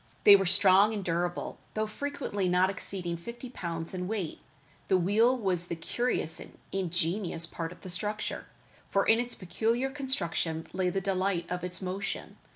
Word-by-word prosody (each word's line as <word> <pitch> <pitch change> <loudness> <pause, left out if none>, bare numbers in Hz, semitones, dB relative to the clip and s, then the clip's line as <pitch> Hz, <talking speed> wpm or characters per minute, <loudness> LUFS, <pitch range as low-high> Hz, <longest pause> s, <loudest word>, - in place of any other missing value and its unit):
They 205 - +11
were 195 -2 +3
strong 195 +4 +6
and 200 - -3
durable, 175 +1 -1 0.2
though 215 0 +1
frequently 215 -5 -2
not 180 +2 +4
exceeding 180 -3 -4
fifty 235 +7 -8
pounds 170 -6 -4
in 180 -1 -3
weight. 200 -6 -3 0.5
The 190 - +4
wheel 220 +8 +4
was 185 -6 +1
the 170 - -2
curious 165 0 -1
and - - -10
ingenious 175 -1 0
part 165 0 -4
of 175 -2 -13
the 185 - -8
structure, 210 +4 -3 0.4
for 195 - +2
in 225 - +5
its 245 0 -3
peculiar 230 +8 0
construction 175 - -1
lay 185 0 +1
the 195 +1 -1
delight 190 -1 0
of 180 -1 -2
its 180 +1 -4
motion. 190 +2 -4
190 Hz, 165 wpm, -30 LUFS, 175-215 Hz, 0.5 s, They